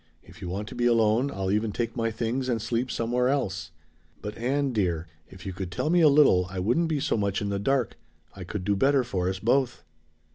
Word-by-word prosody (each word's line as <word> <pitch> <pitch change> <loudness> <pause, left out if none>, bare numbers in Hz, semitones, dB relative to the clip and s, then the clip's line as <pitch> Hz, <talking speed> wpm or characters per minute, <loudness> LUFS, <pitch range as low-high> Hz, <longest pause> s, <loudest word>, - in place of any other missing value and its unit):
If 90 +4 -16
you 90 - -5
want 100 +3 -4
to - - -8
be 120 - +1
alone 115 +3 +3
I'll 95 -6 -2
even 105 +1 0
take 115 +2 -3
my 115 -2 0
things 120 +4 -2
and 115 -2 +1
sleep 120 +4 -2
somewhere 125 +2 0
else. 95 -9 -1 0.5
But, 105 0 -6
Ann, 135 +3 -1
dear, 90 -6 0 0.2
if 95 -1 -13
you 95 - -4
could 90 0 -5
tell 155 - -1
me 175 0 +4
a 155 - +7
little 140 -11 +5
I 95 - -7
wouldn't 120 - +1
be 155 -2 0
so - - 0
much 100 -2 0
in 100 - -3
the 100 0 -1
dark; 130 +3 0 0.4
I 95 - -7
could 95 +2 -5
do 100 0 +2
better 135 +5 +3
for 95 -7 -1
us 95 - -3
both." 120 +4 +1
115 Hz, 230 wpm, -26 LUFS, 95-125 Hz, 0.5 s, a